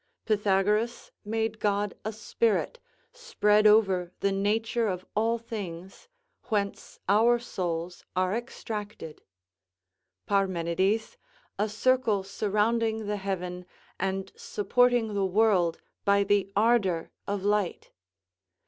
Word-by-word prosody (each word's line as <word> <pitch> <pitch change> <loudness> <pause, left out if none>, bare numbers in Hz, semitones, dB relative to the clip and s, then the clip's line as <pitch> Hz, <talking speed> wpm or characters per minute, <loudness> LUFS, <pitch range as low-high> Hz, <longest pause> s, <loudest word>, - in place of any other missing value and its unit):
Pythagoras 210 +2 +1
made 220 0 -2
God 205 -1 0
a 215 - -2
spirit, 220 - -1 0.3
spread 215 - +3
over 195 -5 +4
the 200 - +2
nature 220 +4 0
of 185 -2 -3
all 225 +2 +2
things, 195 - -8 0.4
whence 200 -3 -2
our 225 +5 +5
souls 175 -7 -4
are 185 +1 +1
extracted; 210 -7 -6 1.0
Parmenides, 190 +2 0 0.4
a 210 +1 +1
circle 215 -2 +2
surrounding 220 +3 0
the 205 0 -2
heaven, 180 -2 -4 0.3
and 195 0 -2
supporting 235 +2 +1
the 200 -1 0
world 190 -4 +2 0.2
by 200 0 +4
the 200 -1 +1
ardour 205 -6 +2 0.2
of 200 -1 -2
light. 205 -3 0
205 Hz, 105 wpm, -28 LUFS, 190-220 Hz, 1.0 s, our